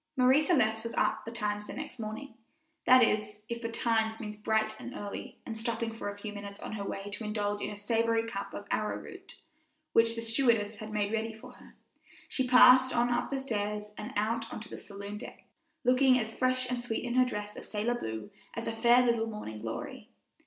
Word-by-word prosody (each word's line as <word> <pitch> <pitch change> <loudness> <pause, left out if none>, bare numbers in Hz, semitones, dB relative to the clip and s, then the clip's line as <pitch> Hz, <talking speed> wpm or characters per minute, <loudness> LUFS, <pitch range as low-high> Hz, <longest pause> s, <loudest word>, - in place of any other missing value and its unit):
Marie 260 +3 +6
Celeste 220 -10 +2
was 230 - -5
up - - +1
betimes 210 -2 -3
the - - -6
next 250 - -7
morning 220 +4 -5 0.5
that 255 0 +8
is, 210 -1 0
if 235 0 -3
betimes 225 -1 0
means 210 -2 -5
bright 220 +1 0
and 250 - -7
early, 205 -1 -6
and, 225 - -5
stopping 225 0 -2
for 225 -2 -4
a 205 - -7
few 210 0 -6
minutes 200 -1 -8
on - - -6
her 210 -2 -4
way 195 0 -4
to 215 - -5
indulge 205 -1 -1
in - - -2
a 205 - -7
savory 225 +2 +1
cup 200 -3 -4
of 205 - -6
arrowroot, 215 0 -3 0.6
which 230 0 +4
the 230 - -4
stewardess 225 -3 +2
had 215 +1 -7
made 210 0 0
ready 225 0 -1
for 220 - -12
her, - - -17 0.5
she 260 -2 0
passed 255 +1 +8
on 240 +1 +3
up 240 - 0
the 275 - -1
stairs 210 -4 -2
and 210 - -6
out 225 +2 0
on - - -5
to 215 - -10
the - - -7
saloon 200 0 -7
deek, - - -10 0.4
looking 255 +1 +5
as 225 -2 -2
fresh 255 0 +1
and 245 -1 -2
sweet 230 -2 -3
in 240 -1 -2
her 255 0 +6
dress 210 -4 -4
of - - -8
sailor 215 +3 0
blue 110 - -5 0.2
as 230 - -3
a - - -1
fair 240 +2 +5
little 235 -2 +2
morning 160 - -6
glory. 115 0 -6
225 Hz, 210 wpm, -31 LUFS, 210-240 Hz, 0.6 s, that